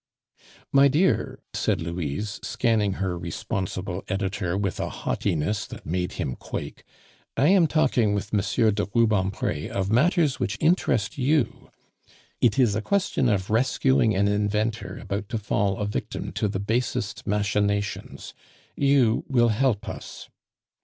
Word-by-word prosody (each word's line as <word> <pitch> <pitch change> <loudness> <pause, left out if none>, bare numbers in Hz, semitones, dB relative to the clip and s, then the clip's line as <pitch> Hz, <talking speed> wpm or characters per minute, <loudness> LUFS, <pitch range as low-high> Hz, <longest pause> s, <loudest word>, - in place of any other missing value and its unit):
"My 140 0 +6
dear," 160 +7 +1
said - - 0
Louise, 85 +4 -3
scanning 110 -5 +1
her 95 -2 -2
responsible 95 +1 -4
editor 95 -2 -2
with 100 -3 -2
a - - -2
haughtiness 95 +6 -1
that - - -10
made 90 +3 -2
him 65 - -3
quake, - - -7 0.5
"I 145 - +4
am 185 -4 +5
talking 125 -9 +2
with 100 +1 -4
M. 105 - +3 0.3
de 105 0 -1
Rubempre 100 -9 +1
of 100 0 -2
matters 150 - +3
which 110 0 -1
interest 140 - +1
you. 140 -1 0 0.7
It 115 -1 +3
is 120 -6 +4
a 110 - -1
question 190 - +1
of 100 -2 0
rescuing 125 -1 +2
an 100 +1 +2
inventor 105 +2 -1
about 100 +1 -4
to 115 - -1
fall 100 -2 0
a 105 - -2
victim 105 - -4
to 105 - -1
the 95 -1 -3
basest 105 -1 -2
machinations; 100 0 -1 0.4
you 135 -5 +3
will 120 -3 +4
help 115 -1 +1
us. - - -8
105 Hz, 140 wpm, -25 LUFS, 100-125 Hz, 0.7 s, My